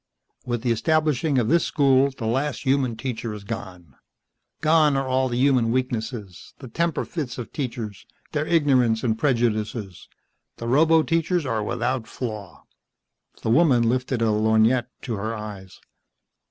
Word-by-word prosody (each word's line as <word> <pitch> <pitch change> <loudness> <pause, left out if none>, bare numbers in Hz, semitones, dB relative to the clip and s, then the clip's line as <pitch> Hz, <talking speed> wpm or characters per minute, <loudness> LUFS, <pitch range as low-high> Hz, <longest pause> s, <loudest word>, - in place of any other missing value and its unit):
"With 120 -1 -2
the 120 - +1
establishing 150 +3 +1
of 120 -3 +2
this 170 +5 +3
school 135 -1 +3
the 130 -4 -7
last 130 +4 -1
human 130 -4 +1
teacher 115 -3 -4
is 105 - -9
gone. 95 - -8 0.7
Gone 155 -2 +4
are 135 -1 -1
all 130 0 +1
the 120 - -2
human 125 -3 +3
weaknesses, 115 -6 -4
the 130 - -10
temper 170 +7 -1
fits 140 -8 -5
of 120 - -7
teachers, 115 -7 -5 0.2
their 150 0 -1
ignorance 130 -9 +3
and 115 -3 +1
prejudices. 110 - -1 0.5
The 115 - -6
roboteachers 160 +5 +2
are 115 -4 -1
without 120 +2 -2
flaw." 105 -8 -7 0.8
The 110 - 0
woman 130 -3 +4
lifted 125 0 0
a 110 - +2
lorgnette 110 +3 +2
to 115 -4 -3
her 110 +3 -3
eyes. 100 -4 -9
120 Hz, 145 wpm, -24 LUFS, 110-140 Hz, 0.8 s, Gone